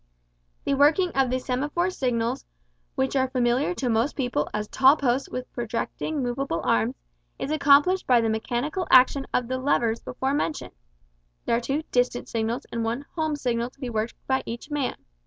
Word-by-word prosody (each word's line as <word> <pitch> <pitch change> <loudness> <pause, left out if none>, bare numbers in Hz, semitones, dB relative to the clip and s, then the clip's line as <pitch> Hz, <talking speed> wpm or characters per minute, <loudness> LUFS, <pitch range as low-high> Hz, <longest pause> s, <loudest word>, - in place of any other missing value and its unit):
The - - 0
working 305 +6 +4
of 270 -2 +1
the 255 - +1
semaphore 290 +8 -1
signals, 240 -7 -1 0.5
which 265 +1 0
are 260 -1 +2
familiar 255 +6 +1
to 265 - -2
most 230 +4 +1
people 245 - -1
as 210 0 -3
tall 270 +6 +5
posts 260 -1 0
with 255 0 -6
projecting 240 +5 -3
moveable 245 -6 -2
arms, 115 +2 +1 0.4
is 285 - -4
accomplished 300 +5 +4
by 250 -2 +5
the 225 - +1
mechanical 245 +10 -2
action 265 +2 +5
of 250 - 0
the 255 +1 -2
"levers" 235 -4 +1
before 265 +2 -2
mentioned. 300 +1 -2 0.7
There - - +2
are 235 - 0
two 275 +6 -2
"distant" 245 0 0
signals 225 +1 -2
and 230 -1 -2
one 235 +5 -2
"home" 315 -2 -1
signal 240 -3 -1
to 265 - -30
be 255 -4 -4
worked 220 +1 -2
by 265 0 +1
each 235 +6 -7
man. 290 -3 -1
255 Hz, 175 wpm, -25 LUFS, 235-285 Hz, 0.7 s, tall